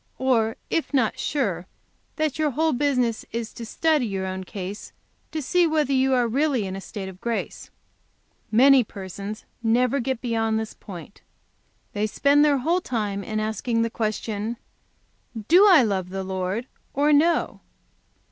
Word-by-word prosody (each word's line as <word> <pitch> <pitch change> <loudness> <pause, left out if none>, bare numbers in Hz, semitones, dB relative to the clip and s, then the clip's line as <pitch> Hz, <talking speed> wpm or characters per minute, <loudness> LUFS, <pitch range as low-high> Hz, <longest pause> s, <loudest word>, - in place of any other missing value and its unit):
Or, 230 -4 +1 0.2
if 320 -3 -1
not 235 -5 +1
sure, 195 - -1 0.5
that 310 -2 -1
your 305 -1 +2
whole 315 +4 +1
business 250 -4 +1
is 230 -1 -4
to 230 - -8
study 310 -1 +1
your 190 -2 -3
own 190 0 -4
case 195 0 -7 0.4
to 315 -2 -3
see 355 +5 +3
whether 305 -3 +1
you 265 0 +3
are 245 -1 +2
really 265 -2 +1
in 190 0 -4
a 195 - -6
state 195 -1 -7
of 190 -1 -11
grace. 235 -1 -4 0.8
Many 260 +3 +6
persons 200 +1 -8 0.2
never 245 +4 +2
get 260 -1 -2
beyond 225 -2 0
this 220 -1 -5
point. 185 0 -11 0.7
They 210 +1 0
spend 285 +6 +3
their 290 -2 +4
whole 335 +8 +1
time 210 - -2
in 215 +1 -3
asking 230 +2 -1
the 230 - -2
question: 220 0 -3 0.9
"'Do 370 +6 +7
I 350 -9 +7
love 190 -5 -1
the 190 +1 -4
Lord 190 +4 -3 0.3
or 295 +2 +3
no? 330 +4 +2
230 Hz, 155 wpm, -24 LUFS, 205-280 Hz, 0.9 s, Do